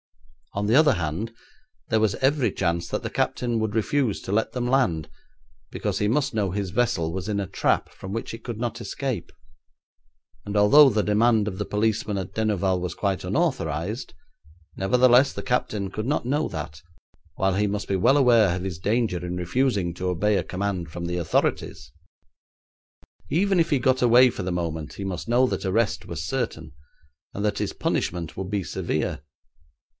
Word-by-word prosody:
On 100 +1 -2
the 110 +4 +3
other 150 -1 +6
hand, 90 +4 -3 0.6
there 110 - +3
was 110 -2 +2
every 135 -4 +1
chance 85 -2 -1
that - - -3
the - - -3
captain 120 -2 -1
would 110 -1 -2
refuse 115 0 +1
to - - -5
let 110 +2 +1
them 125 0 -2
land, 115 - +1 0.6
because - - -3
he 105 - +1
must 135 +3 +1
know 105 -4 0
his 100 -1 -3
vessel 85 -8 0
was 95 +2 -4
in 100 -1 0
a 100 - -1
trap 95 - 0
from 95 - -9
which 115 +2 -4
it 115 - -9
could 120 -3 -5
not 115 0 -3
escape, 130 0 -4 1.1
and 105 +1 -3
although 135 +8 +7
the 105 -3 +1
demand 110 0 +3
of 95 -2 -4
the - - 0
policeman 105 0 0
at 95 -1 -5
Denouval 100 -4 0
was 90 -1 -4
quite 100 -2 -1
unauthorised, 85 - -2 0.6
nevertheless 125 +6 +4
the - - -6
captain 110 -6 -1
could 110 +2 -4
not 145 -3 0
know 145 +5 0
that, 75 0 -6 0.5
while 95 0 +1
he 105 +2 +1
must 100 0 -3
be 100 - 0
well 115 +10 +4
aware 115 -9 +5
of 90 - -4
his 90 -4 -4
danger 105 -3 0
in 90 0 -4
refusing 90 0 0
to 90 +2 -3
obey 100 +4 +1
a - - +1
command 95 -3 -3
from 85 +1 -5
the 85 +1 -2
authorities. 85 -2 -1 1.4
Even 195 +3 +2
if 165 - +2
he 145 - +2
got 130 +1 +2
away 125 +1 +6
for - - -5
the 90 - -2
moment 80 -3 -3
he 100 - -5
must 95 +3 -5
know 125 +2 +4
that - - -2
arrest 95 -1 0
was 80 -1 -5
certain, 80 -10 -3 0.6
and 100 - -3
that 105 -1 0
his - - -1
punishment 85 -2 -2
would 95 0 -5
be 100 -2 -1
severe. - - -2
105 Hz, 185 wpm, -25 LUFS, 90-120 Hz, 1.4 s, although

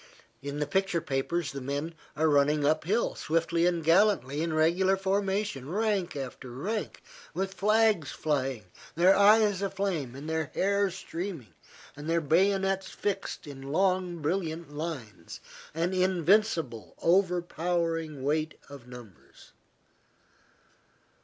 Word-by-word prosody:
In 140 +1 -5
the 150 - 0
picture 190 +2 0
papers 145 +1 -2
the 140 - -6
men 140 +5 -3 0.2
are 160 +1 +2
running 145 0 +3
uphill 155 +9 +1
swiftly 165 +1 +1
and 170 -2 0
gallantly, 165 - +3
in 165 0 -1
regular 175 +5 +3
formation, 195 -6 -1
rank 195 -3 0
after 130 -2 -6
rank, 195 - -4 0.3
with 190 +2 -2
flags 210 -4 +2
flying, 135 -6 -1 0.3
their 180 +4 +5
eyes 205 -1 +5
aflame, 190 -10 -2
and 140 +3 -8
their 160 0 -1
hair 200 +1 +2
streaming, 170 - -6 0.4
their 160 +3 -1
bayonets 195 +4 +2
fixed, 200 -1 -3
in 140 -2 -9
long, 180 +3 0
brilliant 165 -2 -2
lines, 130 - -6 0.4
an 170 +3 0
invincible, 185 - +1
overpowering 170 -4 0
weight 155 +2 0
of 140 -4 -11
numbers. 120 -6 -14
165 Hz, 115 wpm, -29 LUFS, 145-190 Hz, 0.4 s, their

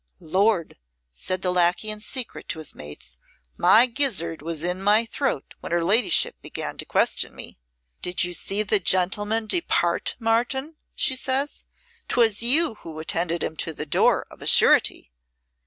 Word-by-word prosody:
"Lord," 185 - 0 0.3
said 185 - -4
the 180 - +1
lacquey 180 +4 +1
in 215 - -5
secret 250 +3 -3
to - - -3
his 155 -2 -6
mates, 65 -5 -11 0.4
"my 230 - +6
gizzard 225 - -1
was 160 0 -4
in 180 +2 -1
my 210 +3 +3
throat 235 - -3
when - - -8
her 170 0 +1
ladyship 210 +8 +2
began - - -5
to - - -5
question - - 0
me. - - -8 0.4
'Did 180 0 +1
you 175 0 -2
see 200 +4 0
the 210 0 +2
gentle, 185 +3 +1
man 220 +1 0
depart, 210 - 0
Martin?' 245 +6 -1 0.2
says 265 +2 0 0.4
she. - - -39
''Twas 225 -3 +3
you 260 +1 +3
who 160 -2 -10
attended 165 +1 -2
him 160 - -4
to 165 - -2
the 150 - -6
door, 145 - +2
of - - -15
a - - -6
surety.' - - +4
195 Hz, 165 wpm, -23 LUFS, 170-230 Hz, 0.4 s, my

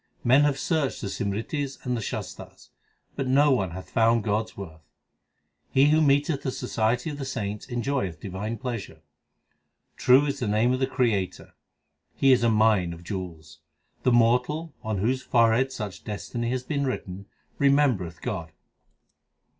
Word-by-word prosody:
Men 135 +4 +5
have 145 -2 +1
searched 150 -1 -1
the 100 - -3
Simritis 115 +9 -3
and 125 -1 0
the 115 - -3
Shastars, - - -7 0.5
but 135 - -2
no 140 +3 +4
one 100 -8 +1
hath 90 +2 -9
found 115 -1 +3
God 110 0 0
s - - -21
worth. 80 -5 -9 0.9
He 135 +2 +4
who 155 +1 +4
meeteth 145 0 +2
the 130 - -2
society 125 +3 -1
of 145 - -7
the - - -3
saints 105 -6 -4
enjoyeth 120 - -2
divine 100 +5 -5
pleasure. 120 -5 -6 0.9
True 130 +3 +5
is 140 - -2
the 120 - -2
name 110 +4 +2
of 130 - -1
the 130 - +1
Creator; 110 -9 -1 0.6
He 135 - +4
is 130 - +5
a 120 - +3
mine 105 -6 +3
of 85 +1 -11
jewels. 85 -5 -7 0.4
The 125 - +2
mortal, 125 +7 +2
on 110 -1 -2
whose 125 +7 0
forehead 120 +2 +3
such 105 -7 -6
destiny 115 +2 -4
hath 125 0 -3
been 140 -3 -1
written, 100 -6 -5 0.3
remembereth 135 - +2
God. 85 -6 -4
120 Hz, 160 wpm, -26 LUFS, 100-135 Hz, 0.9 s, Men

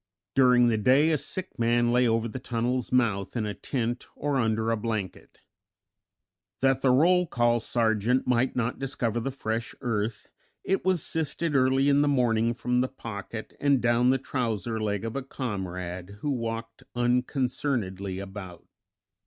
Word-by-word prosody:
During 125 -2 +5
the 115 -2 +2
day 135 +8 +4
a - - +3
sick 185 +4 -5
man 120 +1 +2
lay 125 0 +4
over 115 0 +1
the 115 +3 -6
tunnel's 120 0 -2
mouth 110 -6 +1
in 115 -3 -1
a 105 - -3
tent 120 0 -3
or 145 -1 -1
under 110 -2 +1
a - - +2
blanket. 110 -4 -5 1.2
That 135 0 +2
the 135 - +3
roll 175 +7 +4
call 120 -4 +2
sergeant 115 +2 +1
might 125 +1 +1
not 125 0 -1
discover 120 -4 -1
the 120 - -2
fresh 115 -3 -4
earth, 110 -3 -3 0.3
it 195 - 0
was 185 -4 +2
sifted 160 0 -2
early 135 +1 +3
in 140 0 +4
the 145 - +2
morning 120 -4 +2
from 125 +1 0
the 130 - -1
pocket 110 -3 -7
and 140 -2 +3
down 120 +1 +3
the 135 - +4
trouser 115 -5 -2
leg 105 0 -1
of 115 - -4
a 140 - -1
comrade, 95 -7 -5
who 145 - -1
walked 115 -1 -4
unconcernedly 120 -6 -1
about. 95 -2 -8
120 Hz, 160 wpm, -27 LUFS, 110-130 Hz, 1.2 s, During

